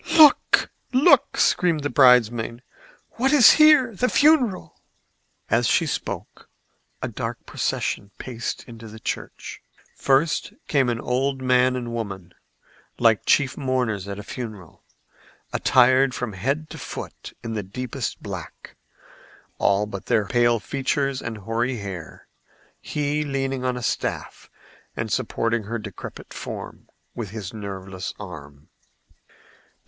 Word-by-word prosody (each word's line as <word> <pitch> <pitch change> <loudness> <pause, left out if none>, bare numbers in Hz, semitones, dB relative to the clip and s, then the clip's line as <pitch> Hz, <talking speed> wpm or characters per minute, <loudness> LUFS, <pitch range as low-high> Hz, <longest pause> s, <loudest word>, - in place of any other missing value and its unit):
"Look! 305 -3 +6 0.2
look!" 275 +7 +5
screamed 170 -6 +2
the 145 - -2
bridemaid. 120 -2 +4 0.5
"What 265 +3 +2
is 280 -7 +8
here? 305 -6 +6
The 250 +6 +1
funeral!" 285 -10 +2 0.7
As - - +2
she - - +3
spoke - - -5 0.5
a - - 0
dark - - -5
procession 100 - -2
paced 115 -3 -5
into 115 -1 -11
the 110 +1 -11
church. - - -6 0.3
First 140 +4 +1
came 135 -4 +2
an 115 -1 -1
old 130 +2 -1
man 130 0 +3
and 120 -2 -4
woman, 100 -6 -5 0.6
like 115 -3 +3
chief 140 -2 +3
mourners 125 -8 -1
at 100 0 -5
a 105 - -7
funeral, 105 -7 -8 0.7
attired 130 +1 +4
from 125 -4 -4
head 140 +11 -2
to - - -8
foot - - -8
in 115 - -4
the 110 - -2
deepest 125 +5 -5
black, - - -8 0.8
all 100 +1 +2
but 100 -2 -8
their 115 -4 +2
pale 120 0 +2
features 135 +2 -1
and 115 -1 -5
hoary 115 +5 -2
hair, 95 -5 -8 0.6
he 150 0 -1
leaning 135 -2 -2
on 125 -1 -1
a 125 - -6
staff - - -3 0.5
and - - -3
supporting 115 -1 -1
her 115 +3 -3
decrepit 105 -4 -9
form - - -8 0.2
with 115 -5 -5
his 105 -2 -7
nerveless 95 -3 -6
arm. 75 -7 -10
120 Hz, 130 wpm, -23 LUFS, 105-135 Hz, 0.8 s, is